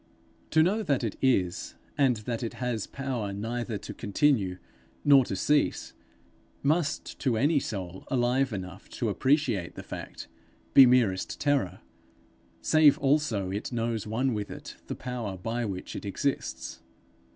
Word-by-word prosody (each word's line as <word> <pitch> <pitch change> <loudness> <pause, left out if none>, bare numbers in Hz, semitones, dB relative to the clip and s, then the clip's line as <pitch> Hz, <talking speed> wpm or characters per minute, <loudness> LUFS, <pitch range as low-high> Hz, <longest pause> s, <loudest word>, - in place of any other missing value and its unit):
To 160 0 +5
know 200 +6 +2
that 140 - 0
it 110 - -2
is, 95 -10 +1 0.2
and 135 -4 +3
that 115 -2 -2
it 115 - -3
has 120 -4 -2
power 130 -7 -3
neither 115 +2 -3
to - - -8
continue 100 -4 +1 0.5
nor 140 -2 +7
to 95 - -3
cease, 145 +9 +1 0.7
must 155 +1 0
to 125 -5 +1
any 145 +5 +3
soul 95 -6 -5
alive 130 +1 +1
enough 95 -4 -7
to - - 0
appreciate 130 - +1
the - - -7
fact, - - -8 0.5
be 135 -2 +10
merest 115 -7 +2
terror, 145 -10 0 0.8
save 155 -2 +6
also 135 -10 +1
it 100 +6 -4
knows 115 -3 -2
one 125 +4 0
with 105 -2 -3
it - - -9
the - - -4
Power 120 -6 -4
by 115 +6 -2
which 95 -3 -5
it - - -5
exists. 135 +8 -3
120 Hz, 145 wpm, -28 LUFS, 105-140 Hz, 0.8 s, be